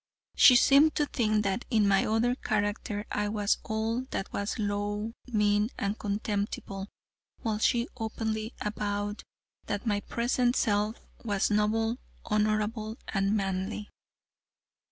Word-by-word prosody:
She 250 - +8
seemed 280 +5 +6
to 295 - +2
think 215 -6 +1
that 195 +3 -1
in 215 -5 +3
my 195 -1 +3
other 225 +3 +2
character 205 -2 -2
I 210 0 0
was 205 -1 +1
all 225 +3 -1
that 195 - -4
was 200 +1 -2
low, 205 +1 -2
mean 210 -2 +2
and 200 +1 -1
contemptible, 200 -1 -3 0.6
while 220 -3 -1
she 235 +1 +2
openly 220 -1 -3
avowed 205 0 -2 0.5
that 205 +3 -3
my 205 -3 +1
present 240 +3 0
self 210 +1 0 0.2
was 205 -2 0
noble, 225 +3 +1 0.3
honorable, 215 +1 0
and 195 +1 +1
manly. 195 +1 -3
210 Hz, 125 wpm, -29 LUFS, 205-225 Hz, 0.6 s, She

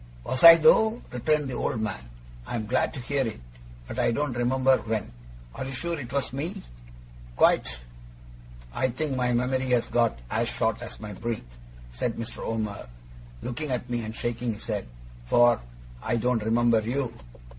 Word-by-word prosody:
'Was 130 +4 -2
I 165 0 +13
though?' 220 +8 +4
returned 150 +4 +1
the 130 - -5
old 120 - -1
man. 95 - -4 0.4
'I'm 115 -3 -3
glad 125 +4 +1
to - - -5
hear 135 0 -1
it, 110 - -6 0.5
but - - -5
I - - +3
don't 145 +3 -1
remember 130 +2 +3
when. 110 - -3 0.4
Are - - -5
you 135 - -5
sure 170 +5 -3
it 125 -3 -7
was 140 -2 -1
me?' 145 +6 -4 0.7
'Quite.' - - +3 1.0
'I 130 - +1
think 135 +3 -2
my 125 -1 +1
memory 130 +2 0
has 125 -2 +3
got 115 - +2
as - - 0
short - - -1
as - - -8
my 105 -1 -7
breath,' 95 - -5 0.3
said 115 - -1
Mr. 115 - -6
Omer, 110 - -3 0.5
looking 135 +5 -4
at 125 -1 -3
me 120 -1 -1
and 110 +1 -6
shaking 120 -1 -2
his 105 - -10
head; 105 - -3 0.4
'for 120 - +5 0.4
I - - 0
don't 120 -1 +1
remember 115 +1 +3
you. 125 +2 -2
120 Hz, 170 wpm, -27 LUFS, 110-130 Hz, 1.0 s, I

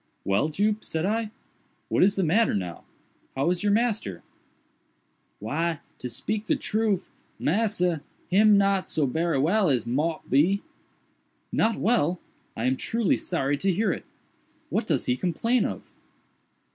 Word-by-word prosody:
"Well, 100 +10 +2
Jup," 210 +6 0
said 160 +1 -2
I, 220 +2 0 0.6
"what - - +1
is 200 +2 +5
the 195 - +1
matter 200 - +3
now?—how 100 - -5
is 180 - -1
your 205 0 +2
master?" 205 - 0 1.1
"Why, 160 +8 -2 0.2
to 125 - -5
speak 215 - -2
de - - +3
troof, 215 -3 -1 0.3
massa, 180 -3 +1 0.3
him 210 +2 +5
not 195 -1 +2
so 155 - +1
berry 160 +3 0
well 180 +7 +3
as 125 -5 +1
mought 150 +7 -1
be." 175 +10 +3 0.9
"Not 225 0 +1
well! 185 -6 +2 0.4
I 115 - -2
am 130 +1 +2
truly 230 - +1
sorry 145 -5 -1
to 190 +6 +1
hear 200 +2 +1
it. - - -5 0.7
What - - 0
does - - 0
he 125 - +1
complain 210 - +1
of?" - - -4
180 Hz, 145 wpm, -26 LUFS, 145-210 Hz, 1.1 s, is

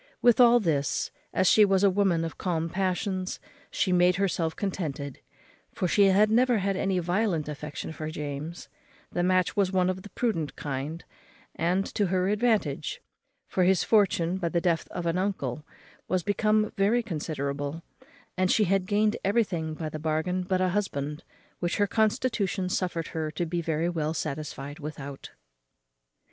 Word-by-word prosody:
With 240 -1 +4
all 240 -1 +7
this, 150 - 0 0.2
as 185 - +1
she 215 - +7
was 195 -1 +3
a 200 - +6
woman 185 -4 +2
of 165 - -7
calm 165 -3 -1
passions, 185 +1 -2 0.3
she 190 - 0
made 180 0 +4
herself 175 -4 0
contented; 150 -8 -4 0.6
for 185 - 0
she 200 +3 +4
had 200 +3 +4
never 245 +1 +4
had 195 0 0
any 190 0 0
violent 180 -2 0
affection 150 +1 -6
for 155 -1 -5
James: 150 +2 -6 0.4
the 175 - -1
match 185 0 +2
was 200 -2 +2
of 185 0 +1
the 205 - -11
prudent 200 -13 -2
kind, 145 +4 -4 0.5
and 180 +4 0
to 205 - +1
her 185 +1 +1
advantage; 225 - 0 0.5
for 185 - +1
his 185 0 +3
fortune, 190 -5 +2
by 175 -3 -1
the 170 - +1
death 170 -1 0
of 175 - -5
an 170 +2 +1
uncle, 155 -9 -2 0.4
was 185 -1 0
become 215 +2 +2
very 215 +5 +2
considerable; 150 -4 -3 0.5
and 185 0 +1
she 215 - +4
had 195 -1 +1
gained 210 +2 +2
everything 190 -7 0
by 160 0 -4
the 155 0 -5
bargain 160 +4 -1
but 185 0 0
a 185 - +2
husband, 150 -6 -2 0.4
which 175 0 -1
her 205 - +3
constitution 215 -3 0
suffered 175 -3 -2
her 160 -2 -3
to 160 +3 -2
be 170 +1 -2
very 160 0 0
well 160 -2 -1
satisfied 145 -1 -5
without. 140 -2 -7
180 Hz, 160 wpm, -27 LUFS, 160-200 Hz, 0.6 s, all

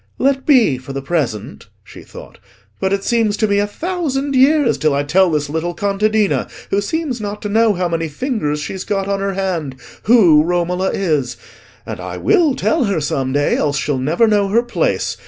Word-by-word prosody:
"Let 270 0 0
be, 235 - +4
for 130 +2 -9
the 135 - -4
present," 135 - -3 0.2
she - - -13
thought; - - -13 0.4
"but 190 - -1
it 200 0 -1
seems 225 -3 +1
to 215 - +1
me 200 0 +1
a 205 - 0
thousand 290 - -3
years 275 0 +3
till 155 -2 +1
I 140 - 0
tell 185 +6 +3
this 150 -2 -1
little 160 +4 -3
contadina, 205 +1 0 0.2
who 200 - +2
seems 265 +1 -3
not 205 0 -5
to 210 - -3
know 220 +1 +3
how 180 -1 -1
many 165 -1 -2
fingers 150 - -2
she's 185 +5 -5
got 195 -1 -2
on 200 0 -1
her 195 -1 -2
hand, 175 -8 -3 0.3
who 190 -10 +6
Romola 180 +3 0
is. 150 -10 -1 0.5
And - - -6
I - - -6
will 340 -9 +2
tell 315 0 +1
her 200 -5 0
some 135 -3 -2
day, 145 +1 +1
else 145 -1 0
she'll 145 -2 -1
never 160 - +2
know 205 -2 +2
her 230 +4 +2
place. - - -1
195 Hz, 195 wpm, -17 LUFS, 155-230 Hz, 0.5 s, who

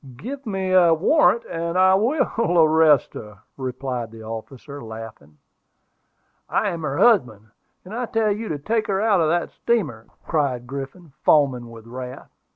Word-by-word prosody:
"Give 270 - -7
me 190 -2 -2
a 185 - +6
proper 165 - +5
warrant, 235 - +3
and 170 +1 -3
I 185 0 +5
will 225 - +1
arrest 155 -3 +4
her," 105 -2 -10 0.2
replied 130 -2 -4
the 110 0 -12
officer, 125 +5 -8
laughing. 110 -10 -10 1.1
"I 205 - +1
am 170 -3 -5
her 145 -2 -3
husband; 110 - +2 0.3
and 190 - -10
I 245 +1 -3
tell 220 -2 +1
you 215 +2 -3
to 150 - -2
take 220 +9 -1
her 195 -2 0
out 205 -4 +3
of 155 - +2
that 175 +1 0
steamer," 150 - -2 0.2
cried 140 -6 -1
Griffin, 140 +4 -8
foaming 130 -6 +3
with 115 -1 -12
wrath. 125 +2 -9
155 Hz, 160 wpm, -22 LUFS, 125-195 Hz, 1.1 s, a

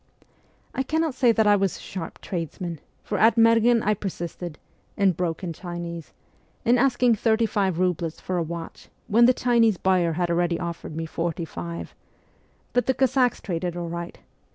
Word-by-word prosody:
I - - -1
cannot 315 +2 0
say 250 -2 +4
that 220 -1 +2
I 205 0 +6
was 195 -2 0
a - - -13
sharp 175 -4 -7
tradesman, 170 -2 -4 0.2
for 205 - -2
at 220 0 +5
Merghen 230 0 +5
I 210 - +3
persisted 175 -4 -5 0.4
(in 200 -2 +4
broken 175 0 -3
Chinese) 170 -2 -7 0.5
in 240 +2 +4
asking 250 -2 +3
thirty 225 +1 +2
five 195 -5 0
roubles 170 -3 -1
for 185 - -3
a - - +1
watch 165 0 -7 0.2
when 235 +3 +5
the - - +7
Chinese 235 -5 +3
buyer 180 -3 +2
had 175 +1 -1
already 170 0 +1
offered 170 -3 -5
me 165 0 -3
forty 165 +1 -3
five; 85 - -7 0.8
but 245 +1 +1
the 260 - +2
Cossacks 260 -1 +2
traded 175 -2 -3
all 170 -1 -4
right. 170 +1 -6
185 Hz, 170 wpm, -25 LUFS, 170-230 Hz, 0.8 s, the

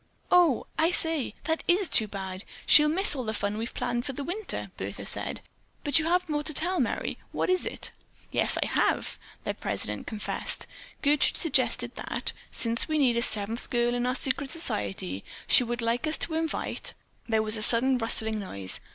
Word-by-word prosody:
"Oh, 345 -8 +4
I 320 +1 +4
say, 320 -9 +4
that 320 +1 -1
is 365 +2 +3
too 220 -7 +3
bad! 190 -1 -6 0.2
She'll 300 0 +7
miss 370 +2 +4
all 260 - -3
the 220 -1 -3
fun 205 0 -2
we've 230 +2 -5
planned 240 -1 -2
for 270 - -5
this 280 +2 -5
winter," 395 +5 -4
Bertha - - -6
said. - - -3 0.4
"But 290 +2 +4
you 315 - -2
have 360 +2 +1
more 295 -2 -1
to 300 0 -4
tell, 360 +3 +2
Merry. - - -2
What - - 0
is 370 - 0
it?" - - -3 0.4
"Yes, - - +1
I - - -4
have," - - 0 0.2
their - - -2
president - - -4
confessed. 215 -2 -1 0.4
"Gertrude 290 0 +3
suggested 250 -5 +1
that, - - -3 0.2
since 230 0 0
we 310 -1 0
need 240 -5 +3
seven 220 +2 -1
girls 240 0 +1
in 245 0 -1
our 250 - 0
secret 270 +1 +1
society, 100 - -1 0.2
she 250 - +5
would 240 0 -3
like 235 +6 0
us 310 - 0
to 330 - +1
invite——" 320 0 -2 0.3
There 220 -1 +2
was 215 0 +5
a 215 - 0
sudden 250 +4 +5
rustling 220 -1 0
noise. 100 - -3
250 Hz, 185 wpm, -27 LUFS, 225-315 Hz, 0.4 s, She'll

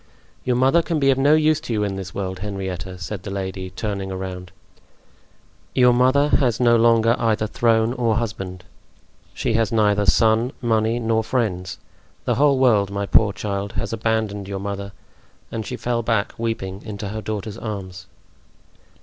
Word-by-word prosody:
"Your 125 - +1
mother 135 +7 +4
can 165 -1 -1
be 135 -1 +4
of 135 - 0
no 145 +3 +5
use 155 -1 +3
to 120 - -4
you 105 -1 0
in 100 -1 -2
this 95 -1 -6
world, 95 -1 -4
Henrietta," 95 -2 -5
said 90 +3 -6
the 100 - -7
lady, 95 -1 -4
turning 100 0 -4
around. 95 -1 -6 1.2
"Your 125 -1 +5
mother 130 +4 +3
has 120 -5 +1
no 120 -1 +5
longer 115 0 +4
either 110 -2 +1
throne 115 +1 +2
or 120 -3 +1
husband; 95 -5 -4 0.7
she - - -1
has 115 -1 +1
neither 105 -2 +2
son, 115 +5 +3
money 115 -1 +1
nor 110 -1 +1
friends; 95 -7 -2 0.5
the - - +2
whole 140 0 +3
world, 110 -7 +3
my 100 0 -2
poor 100 +1 +4
child, 100 -1 -4
has - - -3
abandoned 110 -3 -1
your 100 -1 -4
mother!" 100 0 -5 0.6
And 110 -2 -4
she 125 - -4
fell 120 -1 -1
back, 110 -3 0
weeping, 110 -4 -3
into 105 -2 -6
her 110 +2 -4
daughter's 110 +1 -5
arms. 95 -4 -6
110 Hz, 165 wpm, -22 LUFS, 100-120 Hz, 1.2 s, no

